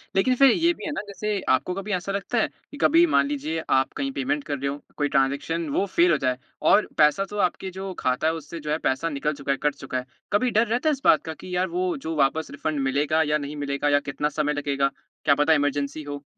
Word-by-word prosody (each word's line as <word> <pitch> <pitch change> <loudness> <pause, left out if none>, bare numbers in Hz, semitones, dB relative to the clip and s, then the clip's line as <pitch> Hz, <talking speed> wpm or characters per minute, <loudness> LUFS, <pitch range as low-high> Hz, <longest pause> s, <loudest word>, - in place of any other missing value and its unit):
लेकिन 255 +7 +3
फिर 270 0 +6
ये 340 +4 +3
भी - - -9
है 295 - -2
ना, 290 - -3
जैसे, 205 +1 -2
आपको 130 +8 +2
कभी 195 +2 -5
ऐसा 185 +2 -2
लगता 200 +4 -2
है - - +2 0.2
कि 290 - -9
कभी 335 +3 +6
मान - - +4
लीजिए, 165 - -3
आप 130 0 +2
कहीं 275 0 -2
पेमेंट 285 +2 -1
कर 145 - -3
रहे 140 +1 -3
हों, 140 - -4 0.2
कोई 145 - +1
ट्रांज़ैक्शन, 145 +4 +1
वो 190 - +1
फ़ेल 175 -2 +3
हो 155 - +3
जाए 130 -2 0 0.3
और 215 - +5
पैसा 150 +6 +4
तो 210 - -6
आपके 190 +2 -8
जो 190 -1 -4
खाता 130 +5 +1
है, 160 - +2
उससे 165 +1 -7
जो 150 0 -4
है, 155 - +1
पैसा 160 +3 -1
निकल 150 +1 -1
चुका 140 - -1
है, 140 - +1
कट 150 -1 +1
चुका 135 -2 -5
है। 125 - -4 0.3
कभी 245 +4 +2
डर 230 - +3
रहता 245 +8 +1
है, - - +4
इस 275 - -6
बात 155 - +5
का 160 - -5
कि 180 +2 -7
यार, 185 +1 +1
वो 360 -1 -1
जो 165 -12 -5
वापस 150 +3 +1
रीफ़ंड 150 +1 -3
मिलेगा 150 +3 +2
या - - +4
नहीं 145 0 -6
मिलेगा 140 +1 0
या 145 0 +4
कितना 150 +2 -1
समय 150 0 +1
लगेगा, 140 -1 0 0.3
क्या 145 - +5
पता 150 +3 +4
इमरजेंसी 145 0 0
हो? 145 0 -7
160 Hz, 255 wpm, -25 LUFS, 145-205 Hz, 0.3 s, फिर